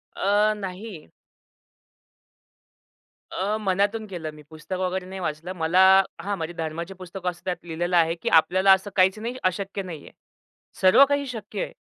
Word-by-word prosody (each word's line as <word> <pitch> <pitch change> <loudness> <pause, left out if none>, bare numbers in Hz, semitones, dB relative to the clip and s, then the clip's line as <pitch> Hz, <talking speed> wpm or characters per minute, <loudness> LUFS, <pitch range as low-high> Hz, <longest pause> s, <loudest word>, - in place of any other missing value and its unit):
अ, 205 +2 +2
नाही. 190 - -8 2.2
अ, 205 +3 -1
मनातून 205 +2 0
केलं 165 -5 -6
मी. 150 - -13
पुस्तक 160 +4 -7
वगैरे 185 0 -2
नाही 190 0 -7
वाचलं. 155 +3 -4
मला 170 +2 +1 0.4
हां, 200 0 -3
म्हणजे 165 +1 -5
धर्माचे 165 +3 -4
पुस्तक 185 0 -10
वाचतो, 180 -1 -3
त्यात 180 -1 -2
लिहिलेलं 175 +2 -1
आहे, 165 0 +3
की - - -3
आपल्याला 185 +4 +4
असं 190 +2 -1
काहीच 190 +2 +3
नाही 235 +3 -4
अशक्य 195 +2 -1
नाहीये. 165 -5 -9 0.7
सर्व 190 +9 +7
काही 285 0 +1
शक्य 215 -4 -6
आहे. - - -7
185 Hz, 150 wpm, -24 LUFS, 170-200 Hz, 2.2 s, सर्व